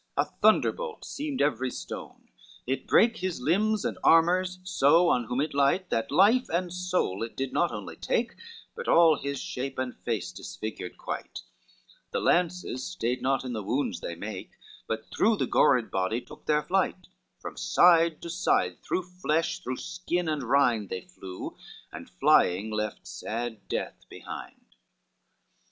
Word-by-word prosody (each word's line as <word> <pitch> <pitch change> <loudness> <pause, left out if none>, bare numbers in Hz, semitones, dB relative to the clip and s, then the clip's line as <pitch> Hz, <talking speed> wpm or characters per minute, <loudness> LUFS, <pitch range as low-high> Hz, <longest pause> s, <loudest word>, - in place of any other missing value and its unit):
LXIX - - +1
A - - -34
thunderbolt 485 -3 +2
seemed 290 -2 -2
every 130 -3 0
stone, - - -8 0.4
it 135 +2 -2
brake 230 0 +4
His 185 -4 -3
limbs 205 +10 +1
and - - -2
armors 180 +3 +4 0.3
on 145 -3 +5
whom 125 - -3
so - - +2
it 150 - -2
light, 145 +7 +2
That 115 - 0
life 205 - +4
and 175 +1 -1
soul 180 - -1
it 115 - -5
did 135 0 -3
not 175 - +2
only - - -7
take - - -1 0.4
But 480 +1 -6
all 165 -2 +6
his 140 -1 -3
shape 135 +1 -5
and 130 -1 -3
face 115 -6 -3
disfigured 110 -4 -7
quite; - - -6 0.7
The - - -1
lances 175 -7 +1
stayed 125 -9 -2
not 135 +1 +1
in 125 - -4
the 110 - -3
wounds 125 +8 -1
they - - -5
make, - - -7 0.3
But - - -2
through 220 -1 +3
the - - +1
gored 125 -4 +3
body 95 +5 0
took 120 - -14
their 150 -1 +2
flight, 185 0 0 0.3
From - - -7
side 170 -2 +4
to 170 - -5
side, 90 - +1
through 185 - -1
flesh, 170 -3 -1
through 130 0 -4
skin 180 -1 -3
and 155 -2 -1
rind 120 -5 +2
They 95 - -4
flew, 95 0 -8 0.4
and - - -9
flying, 100 +5 +3
left 105 -1 -3
sad 115 -2 -5
death - - -4
behind. - - -9
150 Hz, 160 wpm, -28 LUFS, 120-180 Hz, 0.7 s, all